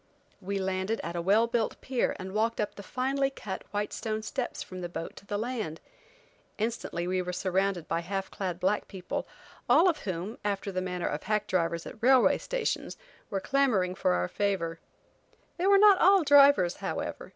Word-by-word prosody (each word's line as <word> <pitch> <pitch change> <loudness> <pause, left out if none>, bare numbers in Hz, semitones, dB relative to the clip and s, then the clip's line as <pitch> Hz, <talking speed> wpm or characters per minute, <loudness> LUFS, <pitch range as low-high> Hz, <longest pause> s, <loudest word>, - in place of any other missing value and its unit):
We 200 +1 -3
landed 190 +3 -1
at 170 +1 -5
a 170 - -1
well 205 +6 +4
built 235 -2 -1
pier 255 -2 -1
and 190 +1 -7
walked 225 +2 0
up 210 - -1
the - - -9
finely 270 +6 0
cut, 205 -8 -7
white 205 0 -2
stone 215 -1 -3
steps 255 +2 -3
from 185 -1 -8
the 175 - -4
boat 165 - -6
to 200 - -13
the 205 - -2
land. 220 -8 -3 0.8
Instantly 215 -6 -2
we 185 +1 0
were 180 0 -4
surrounded 185 -1 -1
by 165 - 0
half 195 +3 -4
clad 180 -3 -4
black 195 +3 0
people, 185 -2 -5 0.4
all 355 - +6
of 330 -4 +2
whom, 185 +4 -5
after 200 -1 -2
the 185 -1 -2
manner 180 -1 -3
of 150 - -3
hack 215 -1 0
drivers 170 -2 -1
at - - -10
railway 255 +1 +5
stations, - - -2 0.3
were 195 - -1
clamoring 220 -8 +1
for 185 - +1
our 90 0 0
favor. 170 - -1 0.8
They 365 +2 0
were 400 0 +7
not 405 -1 +7
all 385 0 +6
drivers, 280 - +6
however. - - -4
200 Hz, 185 wpm, -29 LUFS, 180-240 Hz, 0.8 s, were